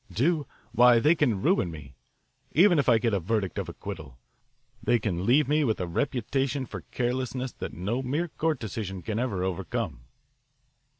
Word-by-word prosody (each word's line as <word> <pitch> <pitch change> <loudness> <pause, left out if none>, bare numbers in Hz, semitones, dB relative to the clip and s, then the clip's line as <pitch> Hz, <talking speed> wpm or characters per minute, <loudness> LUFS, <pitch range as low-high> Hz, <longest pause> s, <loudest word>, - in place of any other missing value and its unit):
Do? 150 - +1 0.2
Why, 120 0 +6
they 150 +8 +5
can 120 - +1
ruin 90 - +2
me, 75 -4 -10 0.6
even 175 0 +6
if 135 - +2
I 115 - +6
get 115 0 0
a 100 - +2
verdict 100 +1 -1
of - - -4
acquittal. 60 -2 -8 0.6
They 120 - +3
can 95 -4 -2
leave 135 +3 +4
me 150 +2 +3
with 110 -6 0
a 90 - -1
reputation 135 - -1
for - - -7
carelessness 125 +1 -2
that - - -7
no 105 +8 -2
mere 145 +7 -1
court 160 -1 0
decision 100 -5 -5
can 110 0 -2
ever 105 -8 -1
overcome." 95 - -3
120 Hz, 170 wpm, -27 LUFS, 95-135 Hz, 0.6 s, Why